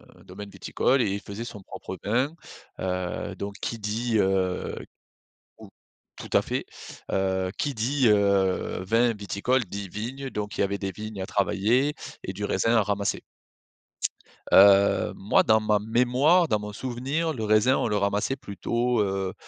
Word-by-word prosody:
un - - -19
domaine 100 -1 -9
viticole 125 +7 0
et 100 - +1
il 100 - -2
faisait 100 +3 -7
son 105 -4 -8
propre 95 0 -8
vin, 125 +8 +1 0.5
heu, 90 +1 -3
donc 100 +1 -6
qui 115 - -3
dit, 110 +3 -2
heu 95 -1 0 0.8
ou - - -13 0.5
tout - - -9
à - - +5
fait, - - -3 0.5
heu, 95 -1 0
qui 145 -2 -1
dit: 125 +3 +1
«Heu, 100 -3 +2
vin, 115 +4 +2
viticole» 105 +5 0
dit: 100 +1 -6
«Vignes» 130 +8 -5
donc 105 0 -4
il - - 0
y - - +4
avait 100 +1 -2
des 100 -1 -3
vignes 105 +1 -7
à - - -2
travailler 110 +9 +1 0.3
et 95 - -5
du 105 +2 -6
raisin 115 +5 +1
à 110 - +4
ramasser. 100 0 -1 1.3
Heu, 100 0 +6
moi 100 - +3
dans 110 0 +4
ma 105 -1 +2
mémoire, 125 - +3
dans 105 - +1
mon 105 0 -7
souvenir, 135 +8 -2
le 110 -4 -4
raisin 110 +5 +4
on - - 0
le 105 -1 0
ramassait 100 +6 0
plutôt, 120 +3 -1
heu, 95 -2 -1
105 Hz, 165 wpm, -26 LUFS, 100-120 Hz, 1.3 s, Heu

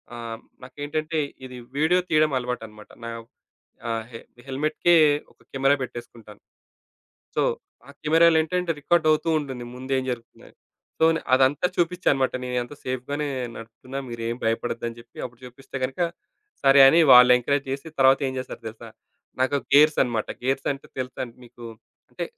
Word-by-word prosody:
ఆహ్, 115 -1 -6 0.2
నాకేంటంటే 150 +4 -4 0.3
ఇది 125 -1 -9 0.2
వీడియో 160 +5 +3
తీయడం 155 -1 +3
అలవాటన్నమాట. 115 -4 -6 0.2
నా 115 - -5 0.8
ఆహ్, 115 0 -3 0.4
హెల్మెట్‌కె 155 +5 +1 0.4
ఒక - - -40
కెమెరా 135 +1 +3
పెట్టేసుకుంటాను. 115 -4 -9 1.0
సో - - +3 0.5
ఆ - - -10
కెమెరాలో 165 +1 +5
ఏంటంటే 175 +1 -1
రికార్డ్ 165 +2 +2
అవుతూ 155 +2 +1
ఉంటుంది. 130 -4 -7
ముందు 130 +1 -6
ఏం 130 - -2
జరుగుతుంది. 115 -2 -8 0.5
సో - - +3 0.3
అదంతా 135 +5 +3
చూపించానన్నమాట. 170 -7 +1
నేనంతా 125 +2 -3
సేఫ్‌గానే 135 +4 -3 0.3
నడుపుతున్నా, 115 +4 -9
మీరేం 115 0 -4
భయపడొద్దు 115 +1 -1
అని 115 - -9
జెప్పి 115 - -16
అప్పుడు 125 -1 -19
చూపిస్తే 135 +2 -11
గనక 130 +6 -5 0.6
సరే 135 0 +6
అని 165 +5 +5
వాళ్ళు 125 0 +9
ఎంకరేజ్ 140 +3 0
చేసి 140 +4 -5
తరువాత 135 0 +5
ఏం 130 - -4
చేస్తారో 130 -2 -7
తెలుసా? 110 0 -11 0.5
నాకు 130 +2 +2 0.2
గేర్సన్నమాట. 135 -7 +4 0.2
గేర్సంటే 135 +1 -1
తెలుసా 130 +1 -4 0.2
మీకు? 120 0 -14 0.5
అంటే - - -4
130 Hz, 135 wpm, -24 LUFS, 120-150 Hz, 1.0 s, వాళ్ళు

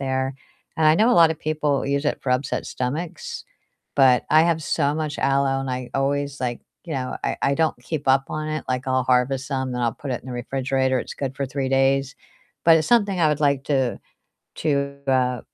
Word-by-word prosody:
there. 130 0 -1 0.4
And 160 - +3
I 155 - +6
know 225 +7 +4
a - - +4
lotta 165 -2 +6
people 150 -2 -1
use 140 +1 0
it - - -1
for 130 - -2
upset 130 +2 -1
stomachs, 150 +7 -4 0.5
but 130 -3 +5
I 155 +1 +6
have 165 -2 +1
so 145 -1 0
much 155 -2 -3
aloe 135 0 +1
and 135 -1 -4
I 125 -1 -4
always, 140 0 -1
like, 120 -2 -2 0.3
you 165 - -5
know 130 -1 -3
I - - -1
I 140 - +2
don't 160 -3 0
keep 145 0 -4
up 135 0 +4
on 155 0 -3
it, 155 -1 -3
like, 130 +1 -2
I'll 130 0 +2
harvest 130 +2 +1
some, 130 -2 -2
then 125 0 -2
I'll 115 - +1
put 140 - -7
it 125 - -2
in - - -15
the 125 - -6
refrigerator, 130 +1 -1
it's - - -5
good 135 -1 -4
for 140 - -1
3 135 0 -3
days, 135 +1 +1 0.5
but 165 -1 +7
it's 155 - -2
something 205 -6 +3
I 155 - +4
would 150 -1 0
like 140 -2 +2
to 135 -4 0 0.6
to, 140 -1 0
uh 125 -2 +2
135 Hz, 215 wpm, -23 LUFS, 130-150 Hz, 0.6 s, but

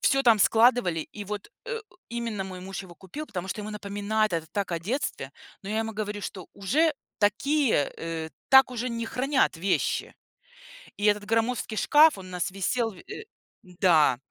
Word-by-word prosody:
всё 275 -1 +3
там 230 -4 +6
складывали. 225 -6 +4
И 205 - -7
вот, 205 0 -6 0.2
э, 470 -2 -3 0.3
именно 235 -4 -3
мой 185 -1 -8
муж 195 +1 -6
его 180 -2 -13
купил, 195 - -8
потому 185 -5 -5
что 210 - -3
ему 210 +1 -6
напоминает 210 +1 -1
это 165 -1 -1
так 200 -3 -2
о 170 - 0
детстве. 180 - -3 0.3
Но 195 - -8
я 215 +1 -1
ему 225 0 -2
говорю, 210 -1 -4
что 185 -3 -6
уже 300 - +2 0.3
такие, 230 - +2
э, 165 -1 -5 0.2
так 265 -1 +7
уже 250 0 -3
не 230 -1 -3
хранят 265 - +1
вещи. 185 +3 0 0.8
И 205 - -2
этот 210 0 +3
громоздкий 225 0 0
шкаф, 305 0 +6
он 190 -1 -9
у - - -11
нас 180 +1 -2
висел 225 +5 -1
в 190 - -15
э 405 - -9 0.4
Да. 175 - +3
210 Hz, 180 wpm, -27 LUFS, 190-240 Hz, 0.8 s, так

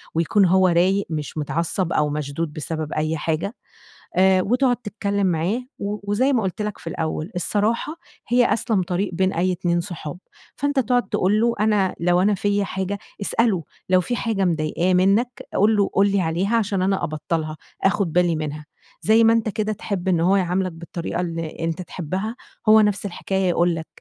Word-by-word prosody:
ويكون 185 +5 +3
هو 185 +1 +4
رايق، 185 +3 +2
مش 155 -1 -4
متعصّب 170 +4 -1
أو 150 -1 +2
مشدود 150 +1 -3
بسبب 155 0 -4
أي 155 +1 -1
حاجة، 165 +9 -2 0.6
آآ 190 0 +5
وتقعد 250 +4 +2
تتكلم 200 -3 -2
معاه 180 +9 0 0.2
و 205 +1 -3
وزي 260 +7 +2
ما 230 -5 +2
قُلْت 190 +2 -3
لَك 210 -1 -3
في - - -13
الأول: 160 +3 -3
"الصراحة 220 - 0 0.3
هي 245 +1 +3
أسلم 220 -4 0
طريق 180 +2 -2
بين 190 +2 +1
أي 185 +2 +1
اتنين 175 -1 0
صحاب"، 175 -3 -7 0.4
فأنتَ 285 0 0
تقعد 245 0 +1
تقول 205 +4 +2
له 235 0 +3
أنا 210 -3 +2
لو 175 +1 +3
أنا 205 +2 +3
فيَّ 205 +1 0
حاجة 190 +1 -3 0.2
اسأله، 200 -5 +1 0.3
لو 185 0 +5
في 240 +8 -2
حاجة 215 -6 0
مضايقاه 170 +2 0
منّك، 200 +7 +2
قُل 215 +3 +4
له، 200 - +3
قُل 200 +1 +3
لي 200 -1 +2
عليها 180 +7 0
عشان 200 -4 0
أنا 195 +1 +1
أبطّلها، 155 0 -3 0.3
آخد 195 -4 +1
بالي 175 -2 +3
منها، 150 -1 -4 0.4
زي 220 +2 +5
ما 225 - +6
أنتَ 225 -1 +1
كده 215 0 -1
تحب 195 -3 -4
إن 175 -3 +3
هو 185 +4 +3
يعاملك 185 0 0
بالطريقة 170 +1 -5
اللي 165 -2 -4
أنتَ 165 +2 -2
تحبها، 185 +6 -4 0.3
هو 220 0 +8
نفس 205 -1 +1
الحكاية 190 0 -1
يقول 175 0 +2
لَك، 160 -1 -6
190 Hz, 180 wpm, -22 LUFS, 170-210 Hz, 0.6 s, هو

